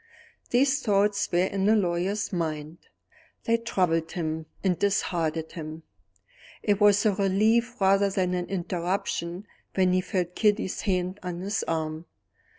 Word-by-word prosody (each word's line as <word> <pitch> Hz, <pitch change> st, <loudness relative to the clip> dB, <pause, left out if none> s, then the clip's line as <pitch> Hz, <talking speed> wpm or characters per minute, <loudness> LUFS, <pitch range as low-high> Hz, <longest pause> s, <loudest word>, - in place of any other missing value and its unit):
These 270 Hz, +3 st, +3 dB
thoughts 205 Hz, -2 st, +1 dB
were 175 Hz, +1 st, +3 dB
in 195 Hz, 0 st, -1 dB
the 220 Hz, -, +5 dB
lawyer's 195 Hz, +1 st, 0 dB
mind. 155 Hz, -2 st, -3 dB, 0.6 s
They 230 Hz, 0 st, +2 dB
troubled 180 Hz, -8 st, 0 dB
him 160 Hz, -2 st, -3 dB, 0.2 s
and 185 Hz, -3 st, +1 dB
disheartened 165 Hz, -5 st, 0 dB
him: 160 Hz, -1 st, -7 dB, 0.8 s
it 205 Hz, -1 st, +1 dB
was 205 Hz, 0 st, +5 dB
a 210 Hz, -, +4 dB
relief 220 Hz, +5 st, +2 dB
rather 195 Hz, +1 st, +4 dB
than 185 Hz, -2 st, 0 dB
an 180 Hz, -1 st, -2 dB
interruption 180 Hz, 0 st, -2 dB, 0.3 s
when 185 Hz, -1 st, +3 dB
he 185 Hz, -, +3 dB
felt 180 Hz, -2 st, -2 dB
Kitty's 210 Hz, -2 st, +1 dB
hand 185 Hz, 0 st, -1 dB
on 180 Hz, -1 st, -5 dB
his 200 Hz, +3 st, -1 dB
arm. 160 Hz, 0 st, -3 dB
185 Hz, 140 wpm, -27 LUFS, 170-205 Hz, 0.8 s, the